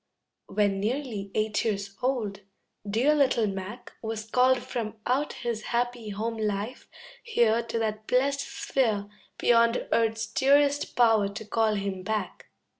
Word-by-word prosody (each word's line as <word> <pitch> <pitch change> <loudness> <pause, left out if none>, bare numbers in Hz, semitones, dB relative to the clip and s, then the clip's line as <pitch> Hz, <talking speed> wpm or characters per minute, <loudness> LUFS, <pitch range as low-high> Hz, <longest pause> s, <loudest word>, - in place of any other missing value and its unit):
When 200 -1 +1
nearly 220 -2 -2
eight 215 -1 +1
years 200 -2 -2
old, 235 -6 -1 0.5
dear 245 +9 +3
little 270 -6 +3
Mac 200 +4 -6
Was 220 -1 -4
called 255 +3 +4
from 225 -2 -4
out 275 +4 0
his 235 -3 -4
happy 240 -2 -1
home 225 +3 -3
life 210 +3 -3 0.3
here 235 - +2
To 230 0 -4
that 215 -1 -2
blest 275 +2 +2
sphere 235 -6 -1 0.3
Beyond 235 0 +3
earth's 225 0 +2
dearest 280 +5 +2
power 225 -4 +4
to 215 +2 -7
call 220 0 +1
him 195 -2 -3
back. 210 0 -3
225 Hz, 135 wpm, -27 LUFS, 210-250 Hz, 0.5 s, called